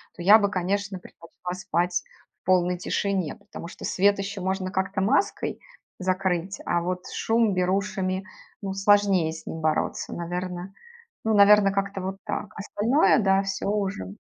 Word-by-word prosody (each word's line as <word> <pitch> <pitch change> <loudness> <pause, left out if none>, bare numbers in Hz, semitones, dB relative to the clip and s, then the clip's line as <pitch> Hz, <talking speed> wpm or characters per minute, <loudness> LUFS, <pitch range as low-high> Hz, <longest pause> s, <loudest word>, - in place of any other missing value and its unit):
то 175 - -9
я 210 +4 +8
бы, 200 -1 +1
конечно, 195 +1 -1
предпочла 180 +1 -9
спать 175 -1 -1 0.4
в - - -72
полной 180 -1 +3
тишине. 190 -1 -1
Потому 200 -4 -10
что 175 - -9
свет 200 +2 +3
ещё 195 0 -4
можно 190 0 -2
как-то 195 0 -1
маской 210 - 0 0.4
закрыть, 185 0 -1
а 175 - +1
вот 180 +1 -2
шум 225 -2 +2
берушами, 185 0 0 0.4
ну 195 -1 -2
сложнее 195 -4 +3
с 160 - -10
ним 160 - -5
бороться. 155 0 -1
Наверно, 180 +2 -5 0.5
ну, 220 -1 +2
наверно, 200 -1 +7
как-то 195 0 -2
вот 190 +1 -4
так. - - -3
Остальное 225 +8 +2
да, 195 -1 +3
всё 195 0 -3
уже. 195 - -2
190 Hz, 150 wpm, -25 LUFS, 180-200 Hz, 0.5 s, я